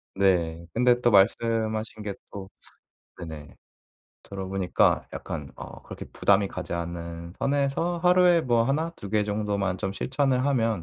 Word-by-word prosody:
네. 85 -4 +1
근데 125 +1 +3
또 120 - +3
말씀하신 110 +1 +2
게 100 -1 -3 0.2
또 95 -1 -8 0.7
네네. 80 -4 -9 0.7
들어보니까 95 -2 0
약간 - - -6
어 - - -10
그렇게 - - -8
부담이 100 -1 +2
가지 90 -2 -6
않는 85 0 -5
선에서 145 +5 0
하루에 180 -1 +5
뭐 120 -4 +2
하나 155 +6 0
두 100 - -8
개 105 0 +2
정도만 100 -2 -1
좀 95 0 -2
실천을 130 +2 0
하면 115 -9 +1
105 Hz, 275 characters per minute, -26 LUFS, 95-125 Hz, 0.7 s, 하루에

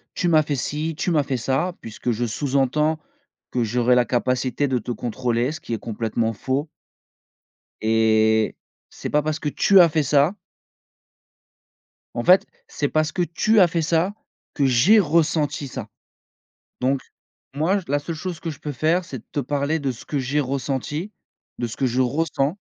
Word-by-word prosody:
«Tu 175 - 0
m'as 155 -2 +5
fait 150 -1 -2
ci, 150 +5 -3
tu 175 - -1
m'as 155 -3 +3
fait 135 -1 -2
ça.» 135 +9 -1
puisque 115 +2 -4
je 120 +1 -2
sous-entends 140 +5 +1 0.5
que 125 - 0
j'aurais 120 +2 +2
la 125 -1 +4
capacité 125 +3 0
de 130 -1 +1
te 120 - -5
contrôler 120 +2 -1
ce 160 - -7
qui - - -5
est 115 - -2
complètement 115 0 -2
faux 135 +7 -2 1.1
et 110 0 +3 0.4
c'est - - -6
pas 150 - +2
parce 155 +1 -2
que 150 - -3
tu 195 +6 +5
as 170 - +8
fait 155 -1 +1
ça 145 +5 +3 1.8
en 120 - -3
fait 185 +2 +6 0.2
c'est 145 - -2
parce 155 +1 0
que 180 - 0
tu 190 +6 +2
as 180 - +6
fait 165 0 -1
ça, 165 +4 +1 0.4
que 140 - +2
j'ai 135 - +5
ressenti 155 -3 +1
ça. 125 -4 -7 0.9
Donc, 130 +1 +1 0.5
moi, 165 +8 +1
la 145 +1 +2
seule 160 +4 -5
chose 175 0 -5
que 170 - -5
je 145 - -9
peux 150 - -5
faire, 160 +7 +1
c'est 135 -6 -7
de 110 - -16
te 145 - 0
parler 145 +2 -1
de 140 -3 -2
ce 115 - -12
que 145 - -2
j'ai 135 +3 0
ressenti, 140 - -3 0.5
de 120 - -1
ce 115 - -7
que - - -1
je 125 +1 0
ressens 140 +4 0
140 Hz, 180 wpm, -23 LUFS, 125-160 Hz, 1.8 s, as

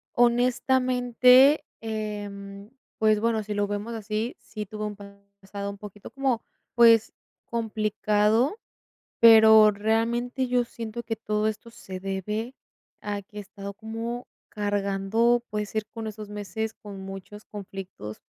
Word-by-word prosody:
Honestamente, 250 +3 +4 0.2
em, 205 -2 -6 0.3
pues, 215 -1 +4
bueno, 225 0 +1
si 210 0 -5
lo 205 0 +1
vemos 205 +3 -4
así, 220 +2 -3
sí 210 -1 -7
tuve 215 +2 -6
un 210 0 -4 0.5
pasado 200 +1 -6
un 200 - -9
poquito 205 0 -10
como, 270 -4 -1 0.3
pues, 230 -2 +6 0.3
complicado. 215 - +1 0.6
Pero 220 -2 +8
realmente 230 +5 0
yo 245 0 +2
siento 235 0 -7
que 225 -1 -3
todo 215 -1 -1
esto 220 +2 -6
se 190 -4 -9
debe 210 +5 -3 0.5
a 205 -1 -4
que 205 +2 -12
he - - -3
estado 200 0 -8
como 225 +3 -5 0.2
cargando, 205 +3 +1
puede 210 -1 -2
ser, 215 +1 -3
con 225 -1 -6
esos 215 -1 -7
meses, 210 +2 -4
con 200 -2 -10
muchos 195 +2 -9
conflictos, 190 - -8
215 Hz, 130 wpm, -26 LUFS, 205-235 Hz, 0.6 s, Pero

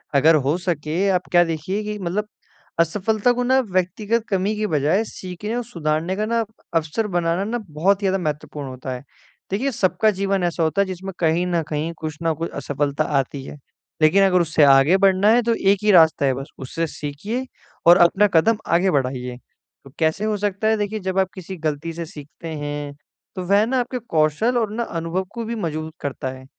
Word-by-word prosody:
अगर 155 +4 +6
हो 155 +5 +2
सके 165 -3 -2
आप 180 -1 0
क्या 175 -1 +6
देखिए 170 +5 -3
कि 210 0 -4
मतलब 195 +4 -2 0.5
असफलता 210 +7 +2
को 245 - -1
ना 260 +2 +3
व्यक्तिगत 205 +5 0
कमी 195 +2 0
की 210 0 -1
बजाय 155 +5 +2
सीखने 195 +3 -6
और 245 - -1
सुधारने 165 -3 -1
का 210 +2 -1
ना 230 +1 +1 0.3
अवसर 165 +7 0
बनाना 170 +2 +1
ना 230 +4 -2
बहुत 190 +7 +1
ही 195 - +1
ज़्यादा 190 - +2
महत्वपूर्ण 150 -1 -4
होता 130 0 -7
है। 125 - -7 0.5
देखिए 255 +8 0
सबका 215 +1 +2
जीवन 195 -1 0
ऐसा 175 -1 0
होता 160 +5 +2
है 200 - +2
जिसमें 190 +1 -6
कहीं 170 +1 +2
न 170 -2 +1
कहीं, 155 +2 -2
कुछ 155 -2 -6
न 165 -1 +2
कुछ 165 +2 -4
असफलता 145 +1 -1 0.2
आती 135 +1 -4
है, - - -9 0.4
लेकिन 175 +6 +5
अगर 180 -2 +4
उससे 160 -2 +2
आगे 140 +6 +6
बढ़ना 195 +1 +4
है 245 - +4
तो 230 0 +2
एक 195 -1 +2
ही 210 - +4
रास्ता 160 -5 +5
है 135 - +3
बस 135 +2 -6
उससे 165 +5 -3
सीखिए 200 - -5 0.4
और 175 - +9
अपना 205 +4 +3
कदम 215 +7 +4
आगे 180 +3 +3
बढ़ाइए। 125 -3 -2 0.5
तो 135 - -13
कैसे 160 +6 +1
हो 215 -1 0
सकता 205 +1 -1
है 220 0 +3
देखिए 210 +1 -2
जब 190 0 -1
आप 190 - +3
किसी 190 0 -8
गलती 155 +1 -3
से 170 0 -5
सीखते 155 +2 -11
हैं 145 -2 -4 0.4
तो 185 - -4
वह 200 +2 +4
ना 255 +2 0
आपके 250 +1 -2
कौशल 210 +4 +1
और 220 -3 0
ना 235 +2 -2
अनुभव 170 0 -3
को 235 - -4
भी 235 - -3
मज़बूत 160 -6 -4
करता 135 -2 -3
है। 130 0 -11
175 Hz, 205 wpm, -22 LUFS, 155-210 Hz, 0.5 s, और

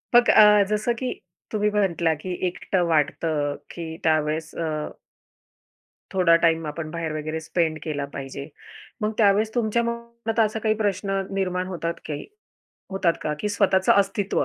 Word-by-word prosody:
मग 240 0 +6
अ, 210 -1 +7
जसं 215 +3 +1
की 255 -1 -2 0.4
तुम्ही 210 -1 +1
म्हटला 175 -5 +1
की 170 +5 -7 0.2
एकटं 180 +1 -1
वाटतं, 150 -1 +1 0.2
की 160 -2 -6
त्यावेळेस 155 0 +1
अ 165 -1 -2 1.5
थोडा 180 -3 +5
टाईम 165 -1 +3
आपण 155 +1 -5
बाहेर 165 -1 -3
वगैरे 155 +1 -3
स्पेंड 160 -1 0
केला 145 -3 -2
पाहिजे. 140 0 -6 0.5
मग 215 - +1
त्यावेळेस 215 +1 +3
तुमच्या 235 0 +1
मनात 235 -1 -4
असा 220 0 +2
काही 215 0 +1
प्रश्न 195 -2 -1
निर्माण 185 -1 -1
होतात 170 -2 -3
काही 150 -2 -5 0.6
होतात 190 -3 +1
का? 150 - -1
की 210 - -1
स्वतःचं 190 -2 +3
अस्तित्व, 200 0 +1
185 Hz, 145 wpm, -24 LUFS, 160-210 Hz, 1.5 s, अ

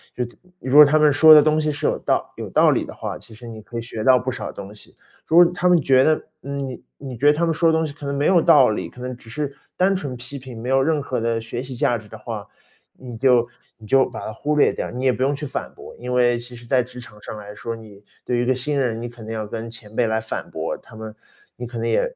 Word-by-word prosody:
就 125 - -1
是 120 - -7 0.3
如 130 +1 -2
果 150 - +11
他 150 +1 +4
们 150 -1 +4
说 155 +3 +8
的 - - +10
东 155 0 +2
西 155 - 0
是 145 - -5
有 - - +1
道 - - -1
有 - - -7
道 - - +4
理 - - +1
的 - - -9
话， - - -5
其 110 - -13
实 120 +2 -12
你 110 -1 -9
可 120 +2 -9
以 - - -2
学 115 -2 -6
到 130 +1 +6
不 130 +1 -2
少 130 - -6
东 100 +1 -9
西。 105 - -16 0.3
如 165 - +3
果 175 - +9
他 180 0 +1
们 175 -1 +5
觉 130 -2 +4
得 155 +1 +3 0.2
你 140 -2 -5 0.2
你 135 -3 -8
觉 140 +6 +1
得 150 - +7
他 170 +3 0
们 165 - +1
说 165 +1 +3
的 - - -1
东 160 - 0
西 145 - -8
可 145 0 -8
能 140 - -2
没 140 +1 0
有 180 -3 +5
道 135 -7 +6
理， - - -4
可 125 - -16
能 125 0 -5
只 115 -1 -17
是 140 +3 -4 0.2
单 190 +2 +3
纯 140 -9 -4
地 140 +3 -8
批 - - -18
评， 125 -4 -9
没 120 - -6
有 135 +1 +3
任 155 +2 +1
何 130 -3 -3
的 115 0 0
学 115 +2 -5
习 130 -1 -7
价 120 0 +1
值 105 -1 -16
的 110 - -10
话， 110 -1 -7 0.5
你 125 -2 -10
就 120 -1 +3 0.3
你 110 - -15
就 135 +4 +4
把 - - -8
它 110 - -6
忽 150 +6 -2
略 150 - +4
掉， - - -4
你 125 +2 -4
也 130 - +4
不 130 - -6
用 140 +2 +2
去 150 +1 -6
反 - - -5
驳。 - - -12
因 125 +1 -5
为 120 -1 +3
其 120 +1 -10
实 120 0 -13
在 125 +2 +2
职 125 +1 -10
场 105 -3 -13
上 110 - -8
来 105 0 -9
说， 115 +2 -5
你 105 -3 -14 0.2
对 125 - 0
于 - - +1
一 120 - 0
个 130 - +2
新 140 +3 -2
人， 115 -3 -1
你 120 - -5
肯 120 -1 -12
定 110 - -4
要 110 -1 -3
跟 115 +2 -6
前 110 -1 -12
辈 120 - +2
来 110 0 0
反 110 - -6
驳 - - -3
他 - - -16
们， 110 -1 -8 0.4
你 120 - -7
可 120 0 -8
能 115 0 -2
也 - - +2
125 Hz, 325 characters per minute, -22 LUFS, 115-145 Hz, 0.5 s, 果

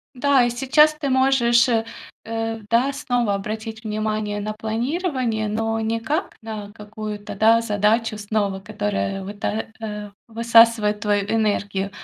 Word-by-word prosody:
Да, 270 0 +3
и 240 - +1
сейчас 275 +5 +4
ты 285 - -1
можешь, 260 -2 +4
э, 225 -1 +2 0.4
э, 225 0 -3
да, 245 +4 +3
снова, 245 -6 0
обратить 220 +2 -5
внимание 215 -1 -2
на 210 +1 -3
планирование, 235 - -2
но 225 +1 -1
не 225 +1 -1
как 300 - -2
на 215 -2 -6
какую-то, 210 -1 -7
да, 225 +3 +4
задачу 215 +1 +1
снова, 205 -2 -1
которая 190 - -3
выта 205 +2 -3
а, 210 -2 -6 0.2
высасывает 230 -2 +4
твою 205 -1 +1
энергию, 205 -3 0
220 Hz, 135 wpm, -22 LUFS, 210-235 Hz, 0.4 s, сейчас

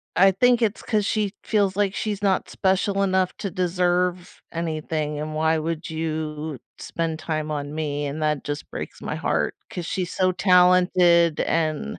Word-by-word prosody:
I 195 +3 +6
think 245 +5 +3
it's 220 -1 0
'cause 210 -3 0
she 210 -2 0
feels 200 -3 +1
like 205 -1 +1
she's 210 -2 -3
not 195 -2 +1
special 195 +1 +1
enough 190 -1 +1
to 200 - -3
deserve 180 0 0
anything, 155 -2 -3
and 155 0 -4
why 160 +1 +2
would 165 +1 -3
you 155 -3 -4 0.2
spend 165 -1 -3
time 155 -1 -3
on 145 0 -4
me? 145 -2 -2
And 150 +3 -5
that 150 -2 0
just 145 0 -5
breaks - - -7
my - - -4
heart, - - -1
'cause 175 -2 -5
she's 180 -2 -3
so 185 -1 +2
talented 180 -3 +4
and 155 - -1
170 Hz, 165 wpm, -24 LUFS, 155-190 Hz, 0.2 s, I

